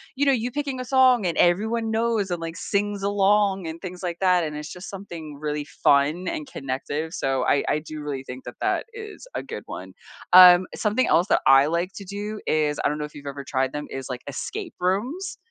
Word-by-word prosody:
you 285 +2 +1
know, - - +6
you 245 -1 0
picking 280 -1 -3
a 255 - -4
song 255 -4 +4
and 170 - 0
everyone 220 +6 +2
knows 220 -3 0
and, 175 -1 -2
like, 165 0 -5
sings 205 +2 -2
along 200 -1 +2
and 160 +1 -6
things 180 -1 -8
like 175 -1 -3
that, 180 -2 +3
and 150 -2 -4
it's 150 0 -6
just 180 0 -8
something 170 -7 -8
really 150 -1 -3
fun 145 +5 +2
and 310 -2 -3
connective, 145 - -4
so 135 -1 0
I 140 - +3
I - - +1
do 155 0 -8
really 140 -3 -4
think 130 0 -9
that - - -8
that - - 0
is 435 +1 -9
a - - -1
good - - -7
one. - - -8 0.4
Um, 180 0 +9
something 215 +4 +1
else 175 +3 +3
that - - +3
I 135 +1 +7
like 170 +4 -1
to 200 - -8
do 205 +2 -5
is 150 -1 +1
I - - +4
don't 150 +1 -3
know 150 - -2
if 150 - -12
you've 145 -1 -11
ever 140 0 -6
tried 130 -1 -1
them 150 0 -5
is 135 -1 -6
like 125 -1 -5
escape 375 - -5
rooms. 240 - -1
180 Hz, 225 wpm, -24 LUFS, 150-215 Hz, 0.4 s, Um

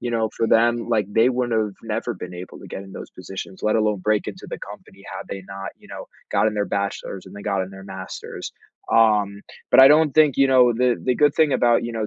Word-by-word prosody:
You 120 - -3
know, 110 -1 0
for 115 - 0
them, 120 +1 +2
like, 110 -4 +1
they 115 +3 +4
wouldn't 120 -3 0
of 105 -2 -3
never 115 +1 -3
been 90 0 -8
able 90 +1 -9
to - - -11
get 95 - -6
in 95 - -13
those - - -9
positions, 95 0 -9
let 105 - +1
alone 105 -2 +1
break 105 +1 0
into - - -9
the - - -6
company, - - -12
had - - -7
they 95 - -6
not, 95 0 -7
you - - -20
know, - - -8 0.2
gotten 110 0 +1
their 105 -1 0
bachelor's, 100 -1 -4
and 95 - -12
then 100 - -9
gotten 95 -3 -1
their 95 0 -11
master's. 95 -1 -8 0.4
Um, 105 -3 +3 0.3
but 130 - +8
I 135 - +10
don't 150 -1 +4
think, 155 -3 +4
you 135 - +5
know 125 -2 +5
the 125 +1 +1
the 125 - +2
good 145 -1 +3
thing 155 -3 +3
about, 120 -2 +3
you 120 - -4
know, 110 -2 -2
110 Hz, 245 wpm, -22 LUFS, 100-120 Hz, 0.4 s, I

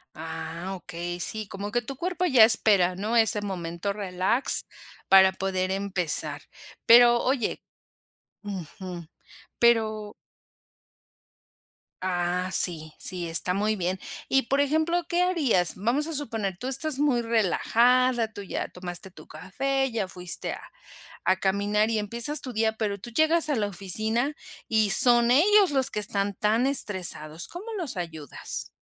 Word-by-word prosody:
Ah, 160 +3 -6
okey, 175 0 -6
sí, 215 +2 +1
como 200 +2 -6
que 240 +1 0
tu 275 +3 -7
cuerpo 360 +4 -2
ya 260 -10 +6
espera, 200 -5 +4
¿no? 215 +5 -3
Ese 220 -2 +3
momento 185 0 -4
relax 195 +5 0 0.4
para 190 0 +7
poder 190 0 -2
empezar. 180 -6 -1 0.4
Pero 240 0 +7
oye 255 -3 -1 0.8
Ujú. 180 -2 -7 0.5
Pero 220 -3 +2 1.9
Ah, 180 0 -1
sí, 155 -3 0
sí, 180 -3 -5
está 165 +2 -1
muy 210 +3 0
bien. 185 -1 -2 0.3
Y, 270 0 +3
por 275 +4 +1
ejemplo, 315 +4 0
¿qué 350 +1 +1
harías? 280 - +1
Vamos 250 - -1
a 325 - -5
suponer, 225 -10 -4
tú 250 - -6
estás 270 +2 +2
muy 275 -5 +1
relajada, 235 +2 +2
tú 205 - -9
ya 195 - -5
tomaste 180 +1 -7
tu - - -15
café, 270 +7 -2
ya 215 -4 -2
fuiste 180 -1 -3
a - - -9 0.6
a 185 - +3
caminar 205 +3 0
y 220 - 0
empiezas 235 +8 +1
tu 255 -3 -7
día, 220 0 0
pero 205 -2 -2
tú 235 +5 -10
llegas 315 +3 +2
a 290 - +1
la 210 -2 0
oficina 220 - +1 0.3
y 220 -2 +2
son 240 +3 +4
ellos 390 +8 +5
los 265 -2 +2
que 210 - -2
están 200 -1 -1
tan 220 +6 +1
estresados, 180 - 0
¿cómo 355 +5 -9
los 310 - -5
ayudas? 160 -5 -6
210 Hz, 145 wpm, -26 LUFS, 185-250 Hz, 1.9 s, para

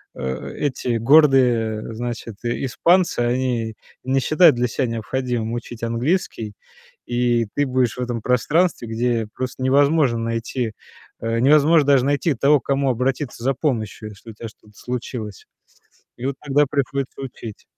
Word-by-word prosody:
э, 65 0 -4
эти 130 -4 -1
гордые, 120 -5 +3
значит, 120 -2 -5
и 120 +3 -2
испанцы, 175 +7 +2
они 120 -2 -1 0.3
не 135 +1 +1
считают 155 +3 +5
для 125 +1 0
ся 130 +3 -1
необходимым 115 0 -3
учить 120 -1 -7
английский. 115 - -1 0.5
И 120 -1 +1
ты 145 - +2
будешь 130 -2 0
в - - -4
этом 120 -2 -3
пространстве, 135 +4 +1
где 115 -1 0
просто 130 0 -4
невозможно 140 -1 +3
найти, 115 0 -3 0.5
э, 115 0 -1
невозможно 150 +3 +5
даже 135 -3 +4
найти 145 +3 +1
того, 140 +4 +4
к - - -25
кому 140 0 +1
обратиться 130 +1 -2
за 135 +2 +2
помощью, 110 -6 -3
если 105 +3 -12
у - - -13
тя 115 +2 -8
что-то 105 -1 -22
случилось. 120 -5 -6 0.7
И 120 - -6
вот 135 0 -1
тогда 145 0 +2
приходится 140 -1 -2
учить. 120 -5 -8
125 Hz, 150 wpm, -21 LUFS, 115-140 Hz, 0.7 s, считают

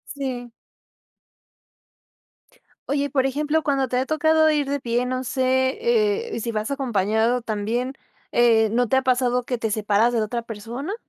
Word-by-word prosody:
Sí. 250 -4 -5 2.4
Oye, 285 0 +1
y - - -2
por 265 -1 +1
ejemplo, 300 +3 0
cuando 275 -3 +1
te 250 - -1
ha 260 - 0
tocado 315 +1 +3
ir 295 -2 +1
de 285 0 -1
pie, 240 0 0
no 255 +1 -2
sé, 260 +1 +1 0.6
eh, - - -3
si 230 +1 -3
vas 215 +2 -3
acompañado 230 -2 0
también, 225 +4 -2 0.4
eh, 225 -2 +4
¿no 245 +2 +1
te 265 - +2
ha 265 - +3
pasado 250 -1 +1
que 245 0 -3
te 225 -1 -2
separas 210 +2 +2
de 230 - +2
la 215 - +1
otra 235 +3 -3
persona? 235 - -6
250 Hz, 170 wpm, -23 LUFS, 230-270 Hz, 2.4 s, eh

